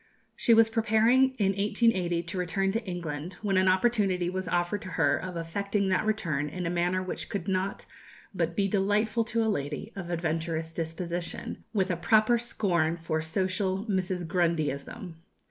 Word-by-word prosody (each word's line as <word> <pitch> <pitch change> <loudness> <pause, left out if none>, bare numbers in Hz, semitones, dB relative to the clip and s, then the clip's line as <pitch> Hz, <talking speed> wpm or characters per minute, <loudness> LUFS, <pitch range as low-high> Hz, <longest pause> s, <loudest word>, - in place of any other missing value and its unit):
She 230 - +4
was 225 0 +6
preparing 230 +4 +3
in 200 -5 +2
1880 195 -4 +1
to 170 +2 -6
return 195 +2 0
to 225 +3 -2
England, 170 -2 -4
when 200 -2 +1
an 190 0 +4
opportunity 185 -3 +2
was 185 0 -3
offered 175 +4 0
to - - -8
her 145 -4 +4
of 180 -2 -5
effecting 200 +4 -1
that 190 +3 +1
return 155 -9 0
in 180 +3 -5
a 170 - -1
manner 175 +2 0
which 185 - -5
could 195 -2 -4
not 190 0 -1 0.5
but 170 -2 -1
be 195 +1 +2
delightful 210 +3 +1
to 230 0 0
a - - 0
lady 175 +1 -2
of 185 -3 -6
adventurous 165 -1 -2
disposition, 170 +1 -4
with 190 -4 +1
a 175 - -1
proper 215 +6 +4
scorn 175 -8 0
for 160 -1 -2
social 190 +4 -1
"Mrs. 185 -4 -1
Grundyism." 165 - -1
185 Hz, 165 wpm, -28 LUFS, 170-205 Hz, 0.5 s, was